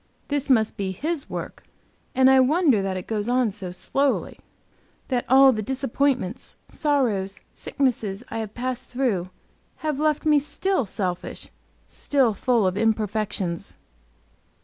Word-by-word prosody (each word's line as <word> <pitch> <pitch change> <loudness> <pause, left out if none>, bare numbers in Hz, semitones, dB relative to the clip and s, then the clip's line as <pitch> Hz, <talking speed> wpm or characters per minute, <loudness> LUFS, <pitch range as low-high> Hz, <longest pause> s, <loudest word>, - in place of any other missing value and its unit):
This 285 -1 -1
must 220 -4 +3
be 190 -1 -2
His 305 - -3
work, - - -6 0.5
and 260 0 +5
I 265 0 +7
wonder 275 - +4
that 190 -1 -2
it 185 - -6
goes 215 0 -2
on 250 -3 +2
so 190 -3 -7
slowly; 275 +9 -1 0.7
that 250 -2 0
all 265 +1 +8
the 220 -3 -2
disappointments, 260 -2 -1
sorrows, 215 -11 0
sicknesses 235 -6 -1
I 225 - -4
have 215 -2 -6
passed 255 +1 -4
through, 235 -9 -1 0.6
have 300 -3 -1
left 305 0 +1
me 300 -1 +5
still 300 - -1
selfish, 185 -2 -4 0.4
still 265 -6 +1
full 230 +1 +1
of 185 +1 0
imperfections. 210 -5 -1
245 Hz, 135 wpm, -24 LUFS, 205-275 Hz, 0.7 s, all